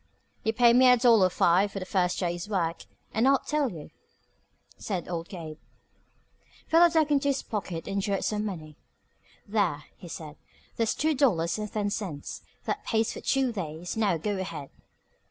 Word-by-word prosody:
"You 220 Hz, -, +2 dB
pay 235 Hz, +1 st, +5 dB
me 255 Hz, +1 st, +7 dB
a 250 Hz, -, +7 dB
dollar 230 Hz, -6 st, +5 dB
five 185 Hz, +3 st, +3 dB
for -, -, -7 dB
the 185 Hz, -, -4 dB
first 180 Hz, -1 st, 0 dB
day's 175 Hz, +1 st, -2 dB
work, 170 Hz, -5 st, -1 dB, 0.3 s
and 225 Hz, +4 st, +3 dB
I'll 275 Hz, 0 st, +6 dB
tell 295 Hz, -1 st, -1 dB
you," 160 Hz, -4 st, -10 dB, 0.8 s
said 185 Hz, -5 st, -4 dB
old 170 Hz, -1 st, -4 dB
Gabe. 160 Hz, -4 st, -8 dB, 1.1 s
Philo 340 Hz, +1 st, +6 dB
dug 315 Hz, -2 st, +2 dB
into 280 Hz, -1 st, +2 dB
his 275 Hz, -1 st, 0 dB
pocket 185 Hz, -6 st, -4 dB
and 200 Hz, 0 st, -1 dB
drew 200 Hz, 0 st, 0 dB
out -, -, -2 dB
some 210 Hz, -1 st, -1 dB
money. 160 Hz, -7 st, -6 dB, 0.7 s
"There," 200 Hz, -8 st, 0 dB
he 180 Hz, -, -12 dB
said. 155 Hz, -2 st, -8 dB, 0.4 s
"There's 230 Hz, -1 st, 0 dB
two 315 Hz, +1 st, +1 dB
dollars 210 Hz, -, +2 dB
and 210 Hz, -1 st, -4 dB
ten 205 Hz, -1 st, -1 dB
cents. 180 Hz, -10 st, -5 dB, 0.2 s
That -, -, -2 dB
pays 225 Hz, 0 st, 0 dB
for -, -, -8 dB
two 270 Hz, -2 st, +1 dB
days. 170 Hz, -4 st, -5 dB
Now, 205 Hz, -6 st, +2 dB
go 200 Hz, +4 st, -2 dB
ahead." 165 Hz, -7 st, -6 dB
200 Hz, 175 wpm, -28 LUFS, 170-235 Hz, 1.1 s, me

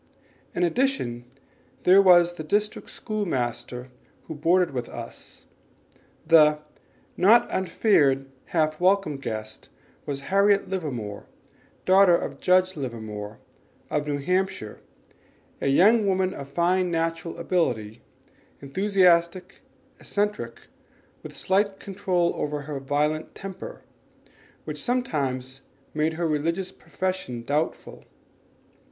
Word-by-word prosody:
In 175 Hz, -, +1 dB
addition, 175 Hz, -, 0 dB, 0.6 s
there 190 Hz, +2 st, +7 dB
was 175 Hz, -2 st, +6 dB
the 160 Hz, -, -7 dB
district 210 Hz, +7 st, -1 dB
school 215 Hz, -2 st, -3 dB
master 125 Hz, -, -3 dB, 0.4 s
who -, -, -6 dB
boarded 170 Hz, +3 st, +2 dB
with 125 Hz, -3 st, -4 dB
us. -, -, -9 dB, 0.8 s
The 155 Hz, -2 st, +6 dB, 0.6 s
"not 215 Hz, +6 st, +5 dB
unfeared, 155 Hz, -8 st, +2 dB, 0.2 s
half 155 Hz, -2 st, 0 dB
welcome 185 Hz, -5 st, +2 dB
guest" 110 Hz, -4 st, -6 dB, 0.4 s
was 140 Hz, -1 st, -3 dB
Harriet 200 Hz, +1 st, +4 dB
Livermore, 125 Hz, -, -5 dB, 0.6 s
daughter 190 Hz, -1 st, +6 dB
of 140 Hz, -4 st, -6 dB
Judge 185 Hz, 0 st, +3 dB
Livermore, 110 Hz, -6 st, -6 dB, 0.5 s
of 150 Hz, 0 st, -1 dB
New 145 Hz, -1 st, -1 dB
Hampshire, 180 Hz, -, -2 dB, 0.8 s
a -, -, 0 dB
young 205 Hz, +10 st, +5 dB
woman 190 Hz, -1 st, +1 dB
of 140 Hz, 0 st, -8 dB
fine 180 Hz, +4 st, +1 dB
natural 165 Hz, 0 st, -2 dB
ability, 120 Hz, -, -1 dB, 0.6 s
enthusiastic, 180 Hz, +2 st, +1 dB, 0.4 s
eccentric, 200 Hz, -, -2 dB, 0.6 s
with -, -, -10 dB
slight 195 Hz, +1 st, +1 dB
control 185 Hz, -3 st, 0 dB
over 150 Hz, 0 st, -3 dB
her 145 Hz, 0 st, -5 dB
violent 150 Hz, +3 st, -1 dB
temper, 195 Hz, -, -8 dB, 0.8 s
which -, -, -5 dB
sometimes 135 Hz, -, -2 dB, 0.3 s
made 155 Hz, +1 st, 0 dB
her 170 Hz, +1 st, -1 dB
religious 165 Hz, +5 st, -1 dB
profession 185 Hz, -11 st, -4 dB
doubtful. 150 Hz, +5 st, -3 dB
165 Hz, 105 wpm, -25 LUFS, 140-190 Hz, 0.8 s, there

